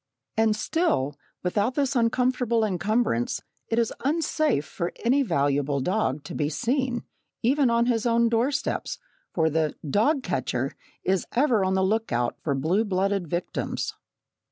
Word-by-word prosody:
And 220 -1 +3
still, 210 - 0 0.3
without 205 +7 0
this 280 -2 +1
uncomfortable 240 -1 +2
encumbrance, 200 - 0 0.2
it 225 - -1
is 235 -2 +1
unsafe 310 - +1
for 170 - -3
any 265 +4 +4
valuable 145 - +1
dog 155 -3 0
to - - -8
be 145 -1 0
seen, 245 - -1 0.4
even 265 +2 +3
on 235 0 +3
his 240 -1 +1
own 235 0 +4
doorsteps, 235 +5 0 0.3
for 160 -2 +2
the 155 -1 0
"dog 255 - +2
catcher" 130 -5 -1 0.3
is 190 -1 +1
ever 245 -6 +3
on 190 0 +1
the 190 - +2
look 220 +4 0
out 120 0 0
for 140 -3 0
blue 165 +10 +1
blooded 195 -2 0
victims. 175 +3 -3
215 Hz, 145 wpm, -26 LUFS, 160-245 Hz, 0.4 s, any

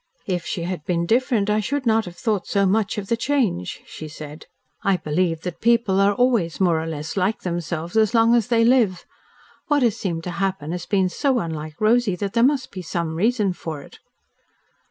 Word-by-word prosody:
"If 180 -3 -2
she 170 - -3
had 175 -3 -4
been 170 0 0
different 230 0 +2
I 210 0 +2
should 260 +6 -2
not 225 -1 +3
have 175 -1 -9
thought 200 +2 -1
so 200 -1 +2
much 205 +2 +1
of 205 - -3
the 230 - +1
change," 230 - -1
she 155 - -8
said. 150 0 -10 0.3
"I 195 -2 +2
believe 165 +1 -1
that 175 -1 -6
people 230 -4 +3
are 200 +1 +3
always 230 -10 +1
more 170 -4 +2
or 160 - -5
less 155 -1 -5
LIKE 195 +3 0
themselves 170 -1 -4
as 220 +1 +3
long 230 +1 +5
as 235 -3 +3
they 230 -2 +3
live. 230 -7 +3 0.6
What 295 -4 +2
has 230 -3 +2
seemed 170 -6 -3
to 180 - -4
happen 185 -4 -2
has 175 0 -5
been 190 -2 +2
so 265 +8 0
unlike 155 -5 -4
Rosy 220 -2 +3
that 195 +2 -4
there 230 - +2
must 260 +1 +2
be 185 - -6
some 170 -2 -3
reason 210 +2 +1
for 155 -4 -6
it." - - -16
195 Hz, 205 wpm, -22 LUFS, 170-230 Hz, 0.6 s, long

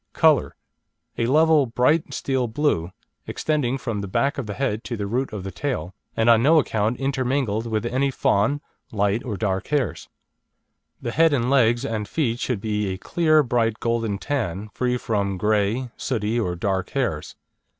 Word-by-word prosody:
COLOUR - - +3 0.6
A 115 - +1
level, 155 0 +4
bright 125 +8 +2
steel 130 -2 -1
blue, 110 - 0 0.4
extending 140 -5 -1
from 115 -5 -3
the 100 - -5
back 140 +9 0
of 125 - -4
the 105 - -4
head 115 -5 -1
to 120 - -4
the 100 - -3
root 125 +6 -1
of 105 -3 -5
the 95 - -5
tail, 95 - -3 0.2
and 115 - +2
on 115 -1 +6
no 155 +6 +5
account 110 -4 +1
intermingled 130 -4 -1
with 110 -1 -1
any 130 +4 +1
fawn, 135 +2 +1 0.3
light 105 +2 0
or 110 -6 -4
dark 95 -2 -1
hairs. 135 - -1 0.9
The 120 - -2
head, 160 +3 +4
legs, 125 -1 +3
and 110 -5 -3
feet 120 -3 -1
should 125 -7 -2
be 105 -1 -1
a 95 -1 -3
clear, 155 - +3
bright, 115 -3 0
golden 115 -3 -1
tan, 105 -6 -3
free 125 -1 0
from 100 -5 -1
grey, 105 +5 0
sooty, 115 -2 -1
or 90 -6 -1
dark 95 +1 -1
hairs. - - -2
115 Hz, 170 wpm, -23 LUFS, 105-135 Hz, 0.9 s, on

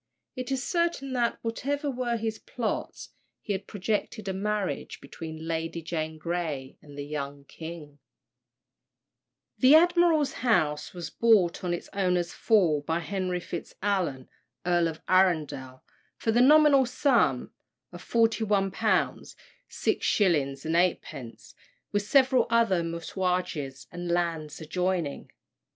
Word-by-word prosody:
It 255 0 -5
is 265 -1 -1
certain 340 -6 -1
that, 240 -2 +1
whatever 280 +5 -2
were 245 -2 -1
his 220 -1 -3
plots, 230 -3 -4 0.3
he 205 - -3
had 190 - -5
projected 210 +1 -3
a 190 - -1
marriage 205 0 -2
between 160 -1 -8
Lady 165 0 -3
Jane 160 -1 -3
Grey 155 -5 -3
and 145 -1 -14
the 145 - -4
young 145 -1 -5
king. 155 -1 -10 1.6
The 265 +3 +7
admiral's 340 -3 +4
house 155 -12 +1
was 175 -1 -6
bought, 210 -8 +3
on 180 - -1
its 175 - -3
owner's 180 -3 0
fall, 180 -10 +3
by 160 +3 -1
Henry 185 +1 -2
Fitz 175 -1 -7
Alan, 180 -11 -1 0.4
Earl 175 -1 +3
of 160 -1 -6
Arundel, 150 -8 +1 0.3
for 225 - 0
the 240 +2 +4
nominal 285 -1 +6
sum 245 - +2 0.4
of 175 0 -10
£41: 220 -4 +1 0.3
6: - - 0 0.9
8, 120 -3 -10 0.4
with 205 - +1
several 255 +3 +3
other 230 -6 +3
messuages 170 -4 -3
and 175 0 -5
lands 165 -4 -1
adjoining. 170 -1 -2
180 Hz, 120 wpm, -27 LUFS, 160-230 Hz, 1.6 s, The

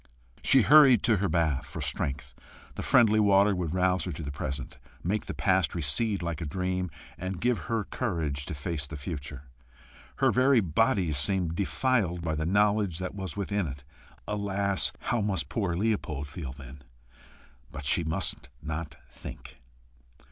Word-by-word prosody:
She 135 -3 +5
hurried 135 -5 +7
to 115 -3 +3
her 95 0 0
bath 80 -4 +1
for - - -7
strength: 70 0 -2 0.4
the - - -6
friendly 110 -3 +4
water 100 0 +4
would 90 -2 -3
rouse 90 -2 +1
her 90 - -3
to 80 - -6
the 70 - -5
present, 70 -1 -5 0.2
make 100 +4 -1
the - - -4
past - - +1
recede 85 +6 +1
like 85 -2 -3
a - - -3
dream, 90 +3 -2 0.3
and 90 +1 -4
give 120 +2 +1
her 115 -2 0
courage 80 - -3
to - - -4
face 75 0 -3
the 75 - -7
future. 70 -2 -6 0.7
Her - - +3
very 130 0 +4
body 95 0 +1
seemed 80 +4 +2
defiled 100 -3 0
by 80 -2 -1
the 80 +1 -2
knowledge 100 -2 +2
that 90 0 -4
was 95 -4 -6
within 100 -2 -1
it. 70 0 -8 0.4
Alas! 100 -3 +1
how 115 0 0
must 95 -8 -1
poor 100 -6 -1
Leopold 85 -8 -1
feel, 75 -4 -7
then! 70 0 -12 0.9
But 70 - -7
she 85 +5 +3
must 80 0 -1
not 75 0 -5
think. 65 +1 -11
90 Hz, 160 wpm, -28 LUFS, 75-100 Hz, 0.9 s, hurried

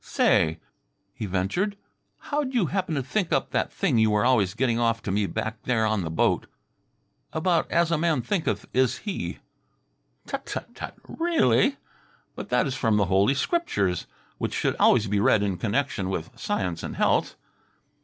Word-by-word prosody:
"Say," 80 0 +2 0.5
he 105 - -5
ventured, 100 - -1 0.4
"how'd 285 -3 -3
you 225 -7 +3
happen 185 -2 -1
to 135 - -1
think 185 +7 -1
up - - 0
that - - 0
thing 115 - +1
you 110 0 +4
were 105 +1 +2
always 110 -6 +3
getting 120 -1 +1
off 115 -1 +1
to 95 - -2
me 100 +1 +1
back 110 +2 -4
there 115 -3 +1
on 110 -2 +1
the 80 - -3
boat 80 - +1 0.9
about 165 +1 +1
as 170 0 +2
a 165 - +2
man 160 -6 +1
thinketh 120 - -1
is 130 -1 +2
he?" 200 -3 -3 0.9
"Tut - - -5
tut - - -6
tut! - - -7
Really? 325 -4 +2 0.6
But - - -7
that - - +2
is 135 - -2
from 115 -4 +1
the 100 - +3
Holy 100 +8 +4
Scriptures, 140 - 0 0.3
which - - -2
should - - 0
always 110 -3 +4
be 105 -1 0
read 105 -2 +4
in 100 -3 -1
connection 110 -2 -1
with 85 -4 -4
Science 90 -3 -2
and - - -5
Health." - - +1
115 Hz, 175 wpm, -26 LUFS, 100-165 Hz, 0.9 s, you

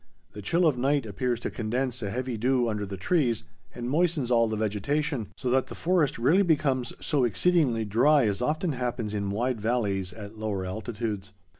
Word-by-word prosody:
The 105 - -7
chill 170 - +2
of 145 -6 +2
night 140 0 +1
appears 120 +3 -1
to - - -3
condense 125 +2 -2
a 100 - -2
heavy 125 +3 -3
dew 125 +2 +2
under 105 -2 -2
the 95 0 -6
trees 120 - +1 0.3
and 120 0 -4
moistens 155 -3 +1
all 115 -1 +4
the 110 0 -2
vegetation, 110 +5 -1
so 125 - -2
that 130 0 +2
the - - -8
forest 170 -5 +1
rarely 145 +12 +4
becomes 140 -8 +1
so 145 -4 +2
exceedingly 125 - +2
dry 125 +6 +4
as 105 +1 -1
often 155 +6 0
happens 120 -4 -3
in 100 -1 -2
wide 115 +3 -1
valleys 100 -5 0
at 110 +1 -10
lower 100 -4 -2
altitudes. 105 +1 -4
120 Hz, 185 wpm, -27 LUFS, 105-140 Hz, 0.3 s, all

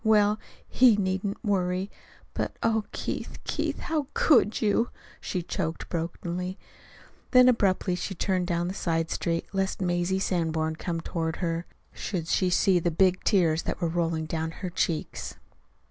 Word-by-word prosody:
Well, 210 -1 +4 0.3
he 245 -4 +6
needn't 195 +1 -2
worry! 185 -1 0 0.4
But - - -3
oh, 220 -2 +2
Keith, - - -4
Keith, - - -2
how 305 -4 -1
could 240 -8 +4
you?" 220 +2 +2 0.3
she 180 -2 -3
choked 165 -1 -3
brokenly. 175 +2 -3 0.7
Then 250 0 +7
abruptly 200 -6 +3
she 185 +2 -3
turned 185 0 0
down 175 0 0
a - - -5
side 165 -3 -1
street, 165 0 -1
lest 195 -1 -1
Mazie 175 0 +1
Sanborn, 160 -4 0
coming 165 -1 -3
toward 165 -1 -2
her, 170 -1 -2 0.3
should 170 -5 -3
see 185 +1 +3
the 175 - +1
big 185 +2 +2
tears 165 -5 +3
that - - -3
were 170 - +1
rolling 165 -1 0
down 160 0 -2 0.2
her 180 - -3
cheeks. 165 -2 -2
180 Hz, 145 wpm, -27 LUFS, 165-200 Hz, 0.7 s, Then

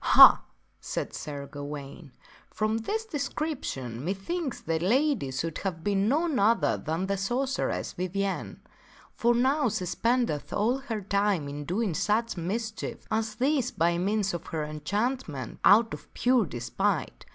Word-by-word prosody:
Ha! - - +9 0.2
" - - -41
said - - -4
Sir 145 -2 -5
Gawaine, 145 +1 -8 0.2
" - - -26
from 215 +1 +1
this 440 - -2
description 275 - -3
methinks 245 - -3
that 165 0 -1
lady 240 - +2
could 155 +5 -3
have 175 -5 -4
been 200 0 +2
none 310 0 +1
other 205 - +3
than 160 - -2
the 200 0 -1
sorceress 245 +7 -1
Vivien. 190 +2 -3 0.5
For 235 +1 +2
now 265 +2 +3
she 205 -3 -2
spendeth 230 - 0
all 235 +6 +1
of 270 - -16
her 225 -5 -3
time 200 -5 +1
in 145 +1 -6
doing 195 +3 0
such 215 +7 0
mischief 215 +6 -4
as 220 0 0
this 260 +1 +1
by 170 -7 +1
means 200 +1 0
of 175 - -5
her 155 -2 -2
enchantment, 155 - -3
out 220 +3 +6
of - - -9
pure 245 -5 +3
despite. 120 -4 -2
200 Hz, 150 wpm, -28 LUFS, 165-240 Hz, 0.5 s, Ha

